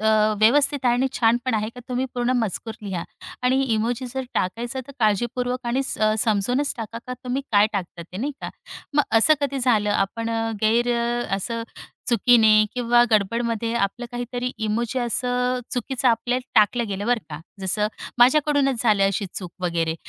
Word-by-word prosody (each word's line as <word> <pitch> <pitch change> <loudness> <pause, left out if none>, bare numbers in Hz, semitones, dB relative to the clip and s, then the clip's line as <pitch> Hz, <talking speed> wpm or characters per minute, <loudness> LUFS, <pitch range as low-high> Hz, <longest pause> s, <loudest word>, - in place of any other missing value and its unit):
अ, 220 0 +2 0.3
व्यवस्थित 280 +6 +4
आहे 240 -1 +4
आणि 260 +2 +1
छान 230 0 +3
पण 255 - 0
आहे 215 0 -1
का 245 - -9
तुम्ही 250 +1 -1
पूर्ण 245 0 0
मजकूर 225 0 -2
लिहा 185 -4 -4 0.4
आणि 255 +2 +3
इमोजी 235 +3 -1
जर 265 - -1
टाकायचं 235 +7 -2
तर 280 - -11
काळजीपूर्वक 245 +4 0
आणि 255 +3 0
स 265 - -4 0.2
समजूनच 235 +6 +1
टाका, 230 0 -6
का 250 - -4
तुम्ही 255 +2 -2
काय 205 0 +6
टाकता 175 -3 -4
ते 175 +2 -11
नाही 275 +8 -2
का. - - -5 0.4
मग 295 - +5 0.2
असं 310 +7 +6
कधी 280 -1 -1
झालं 220 -5 +2
आपण 205 +3 -1
अ, 225 0 -1
गैर 235 +3 +2 0.4
असं 230 +4 -3 0.5
चुकीने 220 -2 +5
किंवा 240 -1 +4
गडबडमध्ये 230 +2 0
आपलं 235 +3 -1
काहीतरी 245 +1 -3 0.2
इमोजी 235 +4 -1
असं 250 +1 0
चुकीचं 255 +1 0
आपल्याला 250 +2 0
टाकल्या 235 +3 +1
गेलं 200 +1 -4
बरं 245 -1 +2
का. 150 0 -6 0.2
जसं 210 +3 0 0.3
माझ्याकडूनच 275 0 +3
झालं 210 -4 +3
अशी 200 +1 -1
चूक 180 -3 -5
वगैरे 165 -2 0
235 Hz, 165 wpm, -23 LUFS, 215-250 Hz, 0.5 s, काय